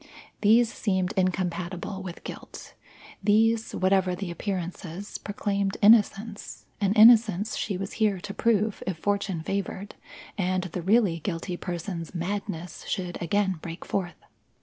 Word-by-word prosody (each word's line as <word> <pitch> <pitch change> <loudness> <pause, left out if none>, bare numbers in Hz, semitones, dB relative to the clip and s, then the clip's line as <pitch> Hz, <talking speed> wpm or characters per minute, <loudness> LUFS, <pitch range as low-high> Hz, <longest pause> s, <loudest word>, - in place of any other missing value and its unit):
These 225 +2 +5
seemed 190 -2 0
incompatible 185 0 -2
with 180 -2 -8
guilt; - - -9 0.5
these, 220 +2 +3
whatever 185 -1 +2
the 180 -1 -5
appearances, 180 0 -5
proclaimed 200 -1 -2
innocence 210 0 +3 0.2
an 200 0 +2
innocence 215 -2 +6
she 200 -4 -2
was 195 +2 -5
here 205 -3 +3
to 200 +3 -7
prove 215 -1 +1
if 185 -3 -2
fortune 200 -3 -1
favoured 195 +2 -3 0.5
and 185 -1 +1
the 180 -1 -5
really 190 -2 +3
guilty 175 +1 -3
person's 175 -1 -5
madness 175 -1 -4
should 180 -2 -3
again 190 0 0
break 170 +1 -7
forth. 180 -3 -3
195 Hz, 125 wpm, -27 LUFS, 180-205 Hz, 0.5 s, innocence